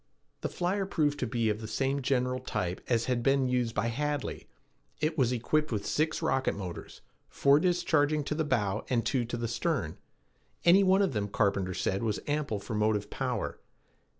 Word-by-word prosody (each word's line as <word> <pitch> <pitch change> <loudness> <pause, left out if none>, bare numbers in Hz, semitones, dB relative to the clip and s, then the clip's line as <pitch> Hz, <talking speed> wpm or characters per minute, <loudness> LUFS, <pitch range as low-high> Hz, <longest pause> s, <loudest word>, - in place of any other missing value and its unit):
The - - -3
flyer 190 +2 -1
proved 150 -6 0
to 125 - -1
be 115 -1 0
of 105 +1 -4
the 110 - -5
same 135 +5 0
general 125 -1 0
type 105 -8 -3
as 115 -2 +2
had 125 -2 0
been 135 +1 +3
used 125 -2 0
by 115 +3 +1
Hadley. 145 +3 -3 0.5
It 155 +1 0
was 130 -5 +2
equipped 150 +5 0
with 105 -3 -2
six 155 +2 0
rocket 135 -4 +1
motors, 90 -4 -7 0.3
four 140 +1 +4
discharging 155 -4 +2
to 145 - -2
the 160 +1 0
bow 110 -8 0
and 120 -3 +1
two 125 -3 +1
to 120 +1 -4
the 115 0 -2
stern. 115 - -2 0.7
Any 180 +3 +7
one 190 +1 +4
of 190 - 0
them, 105 -2 -1
Carpenter 100 -3 0
said, 95 - -1
was 110 -3 -1
ample 145 -8 -1
for 110 - -7
motive 105 -1 0
power. - - -3
125 Hz, 185 wpm, -30 LUFS, 110-150 Hz, 0.7 s, Any